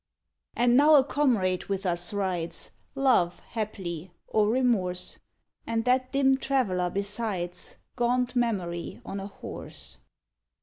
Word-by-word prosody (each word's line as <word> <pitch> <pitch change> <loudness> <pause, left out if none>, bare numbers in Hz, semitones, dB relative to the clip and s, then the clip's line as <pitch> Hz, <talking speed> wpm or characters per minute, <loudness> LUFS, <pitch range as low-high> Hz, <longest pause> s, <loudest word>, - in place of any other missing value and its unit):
And 240 0 +4
now 300 +3 +7
a 275 - +7
comrade 230 -11 +1
with 195 0 -3
us 175 +2 0
rides, 185 -5 -2 0.2
Love, 255 -11 +3
haply, 190 -6 -5 0.2
or 210 -1 +2
Remorse; 220 -8 +1 0.5
And 225 0 0
that 255 +1 +2
dim 270 -1 +4
traveler 215 -11 +1
besides, 200 -2 -3 0.2
Gaunt 250 +1 +1
Memory 185 -8 -1
on 195 - -4
a 195 - -5
horse. 65 - -8
210 Hz, 120 wpm, -28 LUFS, 180-250 Hz, 0.5 s, now